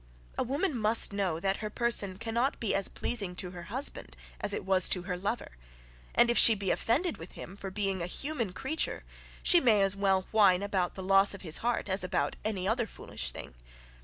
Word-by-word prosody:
A -, -, -2 dB
woman 285 Hz, +6 st, -1 dB
must 220 Hz, -2 st, +4 dB
know, 190 Hz, -5 st, -1 dB
that 195 Hz, +2 st, 0 dB
her 215 Hz, -, -5 dB
person 210 Hz, -4 st, +1 dB
cannot 235 Hz, +5 st, -2 dB
be 220 Hz, -, -1 dB
as 195 Hz, -, +1 dB
pleasing 200 Hz, -7 st, -4 dB
to 180 Hz, 0 st, -4 dB
her 175 Hz, -1 st, -9 dB
husband 205 Hz, -, -2 dB, 0.2 s
as -, -, 0 dB
it -, -, -3 dB
was 190 Hz, -1 st, +4 dB
to 180 Hz, -, +1 dB
her 180 Hz, 0 st, -4 dB
lover, 195 Hz, -, -4 dB, 0.6 s
and 240 Hz, 0 st, +5 dB
if 235 Hz, -, +4 dB
she 225 Hz, -, +8 dB
be 195 Hz, -2 st, -2 dB
offended 295 Hz, +9 st, 0 dB
with 165 Hz, +2 st, -11 dB
him 190 Hz, -, -10 dB
for 195 Hz, -1 st, -7 dB
being 195 Hz, -1 st, -2 dB
a 170 Hz, -, -3 dB
human 250 Hz, 0 st, -3 dB
creature, 270 Hz, -, -3 dB, 0.4 s
she 350 Hz, -, +6 dB
may 220 Hz, -8 st, +3 dB
as 195 Hz, 0 st, +2 dB
well 195 Hz, -1 st, +1 dB
whine 200 Hz, -4 st, +4 dB
about 190 Hz, -3 st, -1 dB
the 190 Hz, -, -7 dB
loss 195 Hz, +1 st, +3 dB
of 195 Hz, -, -12 dB
his 160 Hz, -3 st, 0 dB
heart 235 Hz, -2 st, -2 dB
as 190 Hz, 0 st, -1 dB
about 145 Hz, -5 st, -1 dB
any 195 Hz, -4 st, -2 dB
other 230 Hz, +1 st, 0 dB
foolish 60 Hz, -, -4 dB
thing. -, -, -9 dB
200 Hz, 210 wpm, -29 LUFS, 185-230 Hz, 0.6 s, she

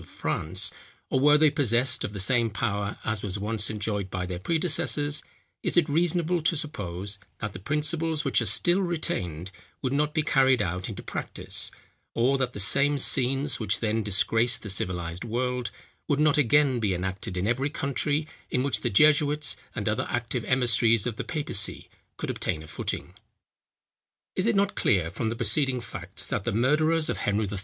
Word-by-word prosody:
of -, -, -15 dB
France, 95 Hz, +5 st, -1 dB, 0.4 s
or 130 Hz, -, +2 dB
were 150 Hz, +2 st, +6 dB
they 155 Hz, -1 st, +4 dB
possessed 125 Hz, -2 st, +1 dB
of -, -, -3 dB
the 100 Hz, -, -6 dB
same 115 Hz, +4 st, +3 dB
power 100 Hz, -1 st, -2 dB
as 110 Hz, -2 st, -1 dB
was 100 Hz, -1 st, -3 dB
once 105 Hz, +1 st, -1 dB
enjoyed 105 Hz, -2 st, -3 dB
by 95 Hz, -1 st, -3 dB
their 90 Hz, -1 st, -5 dB
predecessors, 150 Hz, -, 0 dB, 0.4 s
is -, -, 0 dB
it 170 Hz, -3 st, +4 dB
reasonable 170 Hz, +2 st, +1 dB
to 165 Hz, +2 st, +2 dB
suppose, 100 Hz, -, -5 dB, 0.2 s
that 105 Hz, -3 st, -4 dB
the 95 Hz, -, -8 dB
principles 150 Hz, -, 0 dB
which 140 Hz, -, +2 dB
are -, -, 0 dB
still 175 Hz, +3 st, +5 dB
retained, 95 Hz, -, -2 dB, 0.3 s
would 130 Hz, 0 st, -1 dB
not 150 Hz, +1 st, +1 dB
be 155 Hz, -, +2 dB
carried 135 Hz, -3 st, +3 dB
out 90 Hz, -2 st, -2 dB
into -, -, -7 dB
practice; -, -, -2 dB, 0.5 s
or 125 Hz, +4 st, +3 dB
that 125 Hz, -2 st, -1 dB
the -, -, -7 dB
same 140 Hz, +9 st, +5 dB
scenes, 135 Hz, +1 st, +1 dB
which 110 Hz, -3 st, -1 dB
then 110 Hz, 0 st, 0 dB
disgraced 110 Hz, +3 st, +1 dB
the 105 Hz, -, -3 dB
civilized 90 Hz, -2 st, -2 dB
world, 125 Hz, 0 st, -2 dB, 0.4 s
would 145 Hz, -1 st, +1 dB
not 150 Hz, 0 st, +4 dB
again 140 Hz, -2 st, +3 dB
be 100 Hz, -5 st, 0 dB
enacted 95 Hz, 0 st, -4 dB
in 90 Hz, -, -1 dB
every 130 Hz, +6 st, 0 dB
country, 145 Hz, +2 st, -1 dB, 0.2 s
in 125 Hz, -, 0 dB
which 140 Hz, -, 0 dB
the 120 Hz, -, 0 dB
jesuits 150 Hz, +5 st, +4 dB, 0.2 s
and -, -, -3 dB
other -, -, 0 dB
active 120 Hz, 0 st, -2 dB
emissaries 115 Hz, -4 st, +3 dB
of 120 Hz, -, -2 dB
the -, -, -4 dB
papacy 150 Hz, -3 st, -2 dB, 0.3 s
could -, -, -3 dB
obtain 80 Hz, -, -3 dB
a -, -, -12 dB
footing? -, -, -5 dB, 1.2 s
Is 185 Hz, -, 0 dB
it 230 Hz, -, +2 dB
not 200 Hz, 0 st, +2 dB
clear 90 Hz, -6 st, +1 dB
from 110 Hz, +4 st, -2 dB
the 115 Hz, -, -3 dB
preceding 135 Hz, +1 st, +1 dB
facts, 115 Hz, -, -4 dB
that -, -, -2 dB
the -, -, -1 dB
murderers 155 Hz, +8 st, +2 dB
of -, -, -2 dB
Henry 105 Hz, +1 st, 0 dB
III. 100 Hz, -1 st, -4 dB
120 Hz, 180 wpm, -26 LUFS, 100-150 Hz, 1.2 s, were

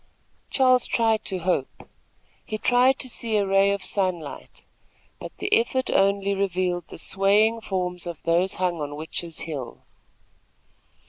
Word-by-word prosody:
Charles 255 Hz, -2 st, +3 dB
tried 225 Hz, -2 st, +1 dB
to 190 Hz, -, -2 dB
hope. 175 Hz, -6 st, -2 dB, 0.6 s
He 215 Hz, -, -4 dB
tried 250 Hz, +4 st, +3 dB
to 260 Hz, -, -2 dB
see 230 Hz, -3 st, -1 dB
a 200 Hz, -, +2 dB
ray 195 Hz, +1 st, +3 dB
of 200 Hz, -1 st, -2 dB
sunlight; 180 Hz, -6 st, -3 dB, 0.5 s
but -, -, -8 dB
the 400 Hz, +2 st, -2 dB
effort 360 Hz, -, +2 dB
only 200 Hz, 0 st, +2 dB
revealed 185 Hz, -3 st, -1 dB
the -, -, -10 dB
swaying 205 Hz, +6 st, +2 dB
forms 180 Hz, -3 st, -3 dB
of 170 Hz, -3 st, -7 dB
those 175 Hz, +4 st, +1 dB
hung 180 Hz, -3 st, -1 dB
on 145 Hz, 0 st, -4 dB
Witches' 160 Hz, +2 st, -5 dB
Hill. 145 Hz, -7 st, -6 dB
195 Hz, 140 wpm, -24 LUFS, 175-220 Hz, 0.6 s, Charles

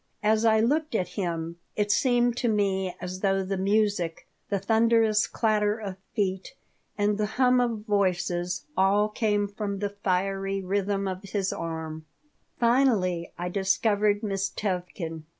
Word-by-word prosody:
As 215 Hz, +1 st, +3 dB
I 220 Hz, -1 st, +5 dB
looked 295 Hz, +3 st, +1 dB
at 180 Hz, -4 st, 0 dB
him 170 Hz, -3 st, -3 dB, 0.2 s
it 205 Hz, -1 st, +1 dB
seemed 245 Hz, -2 st, +3 dB
to 245 Hz, -, 0 dB
me 195 Hz, -4 st, 0 dB
as 185 Hz, +1 st, -5 dB
though 195 Hz, 0 st, +1 dB
the 195 Hz, +1 st, -2 dB
music, 200 Hz, -3 st, 0 dB, 0.2 s
the 200 Hz, -, +1 dB
thunderous 220 Hz, +1 st, +3 dB
clatter 210 Hz, -1 st, +1 dB
of 200 Hz, -4 st, -6 dB, 0.2 s
feet, 190 Hz, +3 st, -2 dB, 0.4 s
and 205 Hz, 0 st, +1 dB
the 210 Hz, -, +1 dB
hum 250 Hz, -1 st, +4 dB
of 230 Hz, -3 st, -2 dB
voices 180 Hz, -3 st, 0 dB
all 200 Hz, +2 st, +3 dB
came 210 Hz, -1 st, 0 dB
from 200 Hz, 0 st, -4 dB
the 205 Hz, +1 st, -2 dB
fiery 195 Hz, 0 st, -1 dB
rhythm 195 Hz, +1 st, -1 dB
of 185 Hz, 0 st, -4 dB
his 200 Hz, -1 st, -2 dB
arm 160 Hz, -1 st, -5 dB, 0.5 s
Finally, 230 Hz, -9 st, +2 dB
I 175 Hz, +1 st, -3 dB
discovered 205 Hz, +2 st, +1 dB
Miss 195 Hz, -1 st, -1 dB
Tevkin. 180 Hz, -5 st, -4 dB
200 Hz, 145 wpm, -27 LUFS, 185-215 Hz, 0.5 s, I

